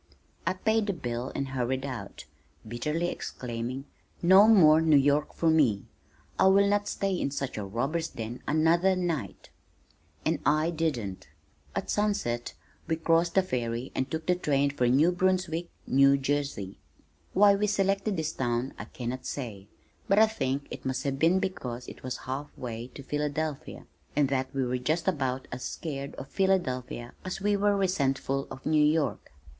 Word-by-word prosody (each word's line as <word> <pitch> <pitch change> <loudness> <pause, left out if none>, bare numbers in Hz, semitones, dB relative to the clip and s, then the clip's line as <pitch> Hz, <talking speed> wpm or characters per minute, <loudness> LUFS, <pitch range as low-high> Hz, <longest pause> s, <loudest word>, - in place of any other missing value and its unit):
I - - +3
paid 220 +3 +1
the 200 - +1
bill 125 -5 -4
and 135 -1 -2
hurried 130 +1 -1
out, 130 - -7 0.4
bitterly 150 +9 -1
exclaiming, 125 0 -5 0.4
"No 190 +4 +8
more 160 -8 +7
New 160 -2 +5
York 145 +2 +2
for 165 -1 +2
me. 130 -11 +3 0.5
I - - +6
will 200 +1 +5
not 205 0 +1
stay 195 -1 -1
in 175 - -1
such 140 -1 -4
a 105 - -3
robbers' 135 +12 -2
den 115 +2 -7
another 170 +5 +3
night." 165 - -3 0.7
And - - +1
I 155 +3 +2
didn't. 135 - -2 0.5
At - - -2
sunset 200 - -1 0.3
we 165 - +1
crossed 165 +1 +2
the 190 - +5
ferry 120 -5 -3
and 130 - -2
took 160 0 -4
the 180 - +3
train 145 -5 +1
for 125 -3 +1
New 145 +8 +4
Brunswick, 180 -2 0 0.2
New 140 +1 +5
Jersey. 135 -8 -2 0.5
Why 200 +1 +6
we 205 +1 +1
selected 195 0 +1
this 160 0 -2
town 120 +1 -1
I - - -5
cannot 125 +1 -5
say, 105 -8 -6 0.4
but 195 - +3
I 220 - +8
think 140 -10 -2
it - - -7
must 130 0 -2
have 135 -1 -2
been 165 +4 +4
because 140 -11 -4
it - - -10
was 130 -1 -4
half 135 +3 -4
way 120 -1 -5
to 140 - -8
Philadelphia 150 +1 -3 0.3
and 145 -2 +3
that 130 -1 -1
we 135 -1 -1
were 125 +1 -1
just 155 +6 -1
about 130 -2 -1
as 125 +1 -5
scared 140 -3 -5
of 135 - -8
Philadelphia 130 -10 -1
as 185 - -4
we 205 +1 +2
were 205 0 +2
resentful 135 -7 0
of 130 - -10
New 155 -1 +4
York. 150 -6 +1
145 Hz, 170 wpm, -28 LUFS, 130-175 Hz, 0.7 s, No